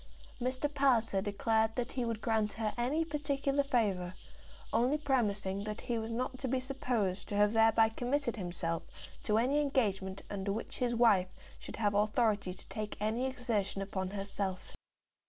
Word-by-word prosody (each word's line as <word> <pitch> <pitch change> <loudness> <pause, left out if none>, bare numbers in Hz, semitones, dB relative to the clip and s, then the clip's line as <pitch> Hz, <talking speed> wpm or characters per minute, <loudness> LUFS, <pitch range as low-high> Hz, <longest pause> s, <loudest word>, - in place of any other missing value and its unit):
Mr. 255 +3 0
Palliser 240 -8 +3
declared 220 +2 +1
that 245 0 -2
he 255 - -2
would 230 -2 -2
grant 220 -2 +1
her 220 -1 -2
any 275 +7 +1
particular 285 -2 0
favour, 200 -9 0 0.6
only 245 +6 +3
premising 205 -9 0
that 210 0 -5
he 235 -2 -1
was 220 0 -4
not 255 +2 -3
to 270 - -2
be 260 +1 +1
supposed 250 -8 -1
to 205 - -4
have 205 +1 +4
thereby 225 0 +5
committed 245 +3 -1
himself 175 -4 -2 0.4
to 215 - +1
any 270 +6 +3
engagement 200 -9 0
under 200 0 -3
which 220 +3 -5
his 240 -1 +1
wife 205 -6 +4 0.3
should - - -8
have 205 -2 +1
authority 210 -1 +2
to 180 - -12
take 215 -1 -5
any 220 +5 0
exertion 230 -7 -1
upon 190 -1 -3
herself. 195 -1 -4
225 Hz, 160 wpm, -33 LUFS, 200-255 Hz, 0.6 s, thereby